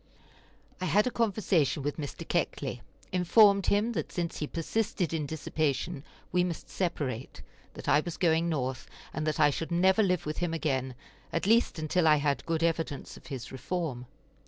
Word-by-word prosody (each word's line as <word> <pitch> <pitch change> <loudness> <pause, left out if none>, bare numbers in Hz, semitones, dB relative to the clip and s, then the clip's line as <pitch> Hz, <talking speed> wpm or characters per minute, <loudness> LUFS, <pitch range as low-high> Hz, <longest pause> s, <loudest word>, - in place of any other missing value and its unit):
I - - 0
had 195 +5 +3
a 250 - 0
conversation 185 - +1
with 145 +1 -2
Mr. 145 -3 -6
Keckley; - - -1 0.3
informed 200 +2 +5
him 210 +4 +2
that - - -3
since 170 -2 -3
he 150 - -2
persisted 180 +1 -1
in 155 -3 -1
dissipation 155 0 -2 0.3
we 180 0 +3
must 175 -2 -4
separate; 140 -9 -3 0.3
that - - -9
I - - +5
was 170 +2 -4
going 170 -1 +2
North, 130 -4 -2 0.3
and 155 0 -2
that 155 - 0
I 145 - +6
should 165 +3 -4
never 190 +4 +4
live 180 -4 +1
with 150 0 -3
him 175 -2 -1
again, 130 -5 -1 0.4
at 165 - -1
least 230 -2 +3
until 160 +2 +1
I 155 - +7
had 145 0 0
good 165 0 0
evidence 165 -3 -1
of - - -14
his 130 -5 -6
reform. 130 -3 -3
165 Hz, 175 wpm, -29 LUFS, 145-180 Hz, 0.4 s, I